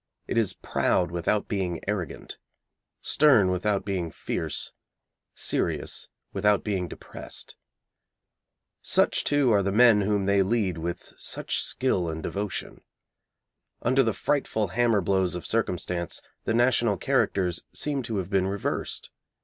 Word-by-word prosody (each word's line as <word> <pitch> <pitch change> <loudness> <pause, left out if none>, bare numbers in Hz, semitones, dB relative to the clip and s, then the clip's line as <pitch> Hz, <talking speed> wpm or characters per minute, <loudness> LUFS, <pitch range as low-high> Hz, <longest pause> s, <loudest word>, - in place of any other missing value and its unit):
It - - -3
is 115 -4 +2
proud 90 -1 0
without 85 +5 0
being 90 -5 -2
arrogant, 95 -6 -4 0.6
stern 130 -11 +5
without 100 +2 0
being 95 -4 -2
fierce, - - -3 0.6
serious - - -1 0.3
without 105 +1 +2
being 95 -4 -1
depressed. - - -7 1.3
Such, - - +2
too, 145 -4 +3
are 100 -2 +4
the 100 0 0
men 110 0 +6
whom 100 -1 +1
they 100 0 +4
lead 95 -4 0
with 85 +2 -5
such - - -1
skill 95 -10 0
and 80 0 -5
devotion. 100 -1 -4 1.0
Under 130 +3 +4
the 115 -4 +2
frightful 110 -5 0
hammer 115 +1 +2
blows 95 -1 +1
of 90 - -6
circumstance, 90 -6 -1 0.2
the - - +1
national 120 -4 +3
characters 90 0 +1
seem 145 -2 -1
to 115 -3 -3
have 95 -1 -3
been 95 -1 +2
reversed. 100 +1 -3
100 Hz, 130 wpm, -27 LUFS, 90-115 Hz, 1.3 s, men